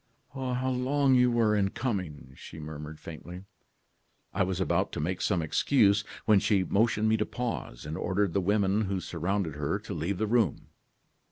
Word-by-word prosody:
"'How 130 -1 -2
long 135 +2 +2
you 125 -1 +5
were 115 -3 +2
in 100 -2 +2
coming!' 90 - -4
she 80 - -11
murmured 75 0 -8
faintly. 85 +4 -9 0.9
"I 100 - -1
was 95 -1 0
about 95 - +1
to - - -3
make 90 +5 -2
some 90 -5 +1
excuse, 100 - +3 0.2
when 105 -2 +5
she 100 -1 +2
motioned 110 +2 +2
me 110 0 +3
to - - 0
pause, 115 - -4
and 75 +1 -4
ordered 95 0 0
the 100 - +2
women 100 +2 +2
who 95 -1 -1
surrounded 90 0 -2
her 75 +6 -1
to 105 0 -7
leave 85 +3 -2
the 110 - 0
room. 110 - +1
100 Hz, 175 wpm, -29 LUFS, 85-110 Hz, 0.9 s, you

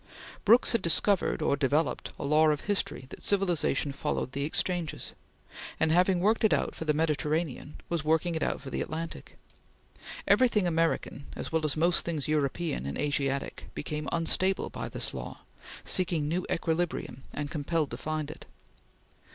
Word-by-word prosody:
Brooks 230 +4 +6
had 230 - +1
discovered 185 +3 +3
or - - +3
developed 145 +1 0
a - - -5
law 155 +2 +5
of 150 -1 +1
history 205 -9 -2
that - - -10
civilization 175 -8 +1
followed 135 -1 -2
the 140 +1 -2
exchanges, 170 +1 -1 0.7
and 160 0 +3
having 180 +2 +4
worked 215 +5 +2
it 220 - +5
out - - -1
for 160 - -6
the 155 - +3
Mediterranean 155 -1 -1
was 170 -2 -1
working 160 +2 +2
it 160 - -2
out - - -1
for 135 -1 -8
the - - -2
Atlantic. 165 +1 -6 0.9
Everything 235 -6 +4
American, 165 -4 0
as - - -5
well 160 -1 +1
as 155 -1 +1
most 170 +2 +3
things 160 -5 -2
European 150 - 0
and 70 - -4
Asiatic, 140 -2 -1
became 150 0 -3
unstable 185 +3 +1
by - - -5
this - - -4
law, - - -7 0.4
seeking 170 -5 0
new 175 +4 -1
equilibrium 165 -5 -1
and 145 0 -4
compelled 155 -1 -1
to - - -4
find 155 -1 -3
it. - - -12
160 Hz, 160 wpm, -29 LUFS, 145-175 Hz, 0.9 s, Brooks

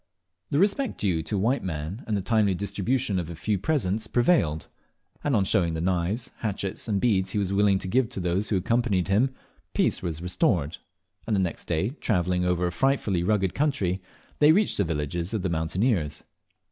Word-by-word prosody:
The 140 - 0
respect 210 - +1
due 90 -6 +1
to 105 - -3
a - - 0
white 120 +8 +1
man 85 - -4
and 105 -2 0
the 100 - -3
timely 105 -3 +2
distribution 100 +2 -1
of 85 -2 -4
a 85 - -6
few 100 +4 -1
presents 110 - 0
prevailed; 120 - +2 0.6
and, 145 -3 +1
on 100 - +3
showing 85 -3 +1
the - - -2
knives, 95 +7 -1
hatchets, 100 -2 -4
and 100 -3 +1
beads 95 -4 +1
he - - -1
was 100 -1 0
willing 100 -1 +4
to 95 - -5
give 120 +3 +2
to - - -6
those 90 +3 0
who 100 - +2
accompanied 100 -2 +1
him, 125 +7 +2 0.4
peace - - +2
was 85 -4 -3
restored, 90 - 0 0.5
and 110 - +1
the - - +2
next 90 -3 -2
day, 85 +5 0
travelling 90 -4 +1
over 90 0 +1
a 90 - 0
frightfully 110 -5 +1
rugged 95 0 +1
country, 125 -11 0 0.4
they 150 +1 +7
reached 205 +5 +2
the 100 - +3
villages 85 +4 -2
of 100 - -2
the 95 - 0
mountaineers. 80 - 0
95 Hz, 195 wpm, -26 LUFS, 90-115 Hz, 0.6 s, they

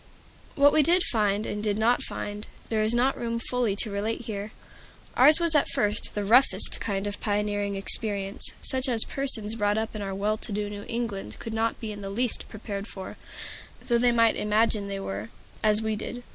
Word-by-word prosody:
What 285 0 +5
we 310 - +5
did 345 +5 +4
find, 210 -2 +1
and 210 - -4
did 210 -1 -1
not 230 +3 +2
find, 205 +1 -6 0.2
there 220 -1 0
is 215 +2 +1
not 255 +3 +2
room 230 -1 -2
fully 230 -3 -1
to 210 +1 -1
relate 210 +4 -2
here. 210 -2 -6 0.6
Ours 295 +6 +7
was 335 -1 +5
at 295 - +3
first 210 +1 -1
the 205 -1 -2
roughest 225 -3 +4
kind 195 -2 -3
of 205 0 -4
pioneering 205 -1 -1
experience; 195 0 +2
such 260 0 0
as 230 -3 +6
persons 230 -6 -1
brought 205 -2 0
up 220 0 -3
in 215 - -5
our 195 -1 -4
well 210 +2 -1
to 220 - -3
do 205 0 -3
New 205 0 -8
England 230 -4 -4
could 225 - -7
not 225 +1 -1
be 220 -2 -5
in 205 -1 -8
the 195 - -6
least 235 +4 -2
prepared 205 -2 -6
for, 190 -4 -8 0.7
though 235 -1 +2
they 245 0 +3
might 230 -1 +3
imagine 210 -1 +1
they 195 0 -4
were, 105 - -5 0.3
as 215 0 +3
we 220 0 -1
did. 245 +3 -6
215 Hz, 200 wpm, -26 LUFS, 205-235 Hz, 0.7 s, Ours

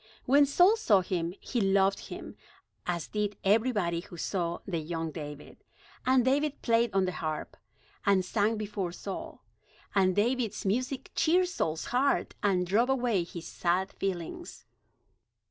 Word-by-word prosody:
When 285 +2 +5
Saul 360 +10 +5
saw 205 - +4
him, 175 -1 -2
he 240 - -2
loved 195 0 +2
him, - - -8 0.5
as 170 -2 -2
did 210 -1 -2
everybody 205 -5 +2
who 175 0 -10
saw 170 -1 -2
the 175 -4 -2
young 160 0 -3
David. 150 -2 -9 0.4
And 255 -1 +4
David 290 +2 +1
played 230 0 +3
on 190 -1 +3
the 185 - -1
harp, 155 -3 -4 0.5
and 195 -3 +3
sang 215 +3 +1
before 200 -4 -3
Saul. 195 +1 -7 0.5
And 185 -2 +3
David's 235 0 0
music 255 +7 -1
cheered 360 +3 +3
Saul's 160 - -2
heart, 275 +3 +2
and 185 -3 +2
drove 220 +8 +2
away 240 -8 +1
his 170 0 -8
sad 185 +2 0
feelings. 195 - -5
200 Hz, 145 wpm, -29 LUFS, 175-245 Hz, 0.5 s, When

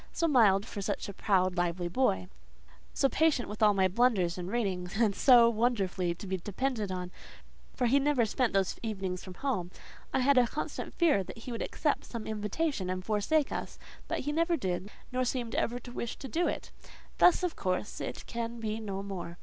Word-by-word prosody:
So 335 - 0
mild 215 -9 +5
for 205 - -6
such 200 +1 -2
a 200 - -6
proud, 185 -2 +1
lively 175 0 0
boy; 170 - +1 0.6
so 275 - +2
patient 300 -3 +2
with 210 +1 -8
all 210 -1 +5
my 190 -1 +4
blunders 190 -4 +2
in 180 -1 -5
reading; 195 -6 -1
and 215 -2 +3
so 245 -3 +7
wonderfully 205 -7 0
to 190 - -9
be 190 0 -2
depended 210 +2 -2
on, 180 -1 -4 0.6
for 250 - 0
he 265 +4 +4
never 275 -4 +2
spent 235 +2 0
those 195 -1 0
evenings 190 -5 -3
from 185 -2 -9
home: 210 -8 -2 0.4
I - - +1
had 270 0 +5
a 245 - +4
constant 295 - -5
fear 310 - +3
that - - -9
he 230 +2 -8
would 230 - -4
accept 300 -2 -1
some 230 -3 -6
invitation 215 - -2
and 185 0 -3
forsake 225 +8 +1
us; - - -5 0.3
but - - -2
he 290 - -2
never 335 +2 +2
did, 185 - -3 0.2
nor 255 0 0
seemed 245 -2 -2
ever 240 - 0
to 245 0 -10
wish 235 -1 -4
to 270 - -7
do 335 +8 0
it. - - -4 0.5
Thus, 360 +1 +6
of 355 -2 -1
course, 185 +2 -2
it - - -5
can 235 0 -4
be 220 -1 -3
no 200 -3 -4
more. 180 -3 -6
215 Hz, 200 wpm, -30 LUFS, 190-255 Hz, 0.6 s, so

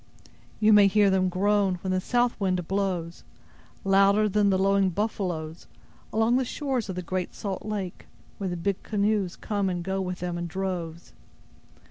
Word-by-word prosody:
You 215 0 +5
may 205 -1 +7
hear 200 0 +4
them 185 -1 +2
groan, 195 +1 +2
when 190 - -1
the 185 0 +1
south 245 +3 +1
wind 185 -4 -1
blows, 185 -4 -2 0.6
louder 200 +2 +4
than 205 0 +2
the 190 - +3
lowing 195 0 +3
buffaloes, 175 -5 -3 0.4
along 225 +3 +2
the 260 - +1
shores 255 -3 -3
of 190 - -3
the 180 - -4
great 185 +1 -3
salt 195 -2 -4
lake, 205 -4 -5 0.3
where 195 -2 -2
the 175 - -3
big 195 +3 -2
canoes 205 -3 0
come 205 -3 -2
and 175 -1 -3
go 190 +1 -2
with 180 -1 -3
them 175 -1 -3
in 175 - -3
droves. 170 -2 -5
195 Hz, 170 wpm, -26 LUFS, 180-205 Hz, 0.6 s, may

